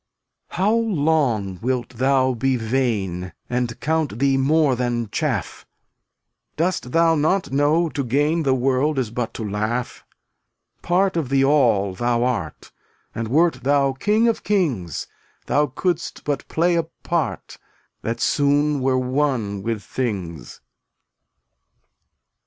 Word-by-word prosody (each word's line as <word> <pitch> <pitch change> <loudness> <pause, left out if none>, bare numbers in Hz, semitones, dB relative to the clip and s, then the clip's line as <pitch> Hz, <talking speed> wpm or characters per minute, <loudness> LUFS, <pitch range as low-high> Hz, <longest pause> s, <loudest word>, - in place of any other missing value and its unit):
276 - - -6 0.4
How 145 - -1
long 120 - +1
wilt 125 0 -1
thou 130 +1 +2
be 130 +3 0
vain 110 -7 -1
And 125 -1 -2
count 155 -7 -1
thee 135 +1 +2
more 140 +1 +3
than 120 -2 -2
chaff? - - -2 0.9
Dost 165 -6 -1
thou 165 +1 +4
not 160 +3 +1
know 150 +5 +2
to 145 -2 -3
gain 145 +7 +1
The 135 -4 +2
world 135 +3 +1
is 125 -5 -1
but 115 -1 -3
to 110 - -4
laugh? 110 +4 -3 0.8
Part 185 +2 +1
of 160 -7 -1
the 135 0 +3
All 120 -9 +3
thou 120 +4 0
art, 100 - -3 0.4
And 115 0 -3
wert 160 +3 +2
thou 140 +1 +2
king 210 - +2
of 230 - 0
kings, 130 - -1 0.4
Thou 150 0 +2
couldst 170 +5 -3
but 145 -2 -3
play 175 +2 +1
a 165 -1 +1 0.2
part 170 -4 -2 0.4
That 115 +1 -3
soon 145 0 +2
were 130 0 +2
one 130 -6 -1
with 110 -1 -3
things. 95 - -4
130 Hz, 130 wpm, -22 LUFS, 115-150 Hz, 0.9 s, thou